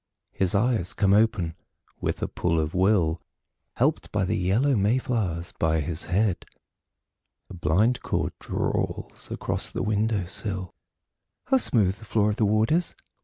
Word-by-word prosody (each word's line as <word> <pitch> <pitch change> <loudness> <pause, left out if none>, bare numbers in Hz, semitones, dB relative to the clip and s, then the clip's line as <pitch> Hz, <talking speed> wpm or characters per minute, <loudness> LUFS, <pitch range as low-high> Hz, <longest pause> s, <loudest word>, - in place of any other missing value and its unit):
His 95 0 0
eyes 105 -4 +1
come 100 -1 +3
open 105 -6 +2 0.5
with - - -2
a - - 0
pull 85 -2 0
of 75 0 -2
will, 90 -4 +2 0.6
Helped - - 0
by 95 - +1
the 90 - 0
yellow 110 +10 +2
may 105 +4 +2
flowers 95 -10 -2
by 80 0 +2
his 80 +3 -3
head. 95 -1 +1 1.1
A - - -7
blind 95 +9 +1
cord - - -1
drawls - - -3
across - - -2
the - - -3
window 105 -2 0
sill... 95 0 -4 0.7
How 265 - +4
smooth 105 - +2
the 110 - -13
floor 105 0 +2
of 105 - -4
the 110 - +2
ward 110 +3 +2
is! 170 +2 +1
100 Hz, 155 wpm, -26 LUFS, 90-110 Hz, 1.1 s, How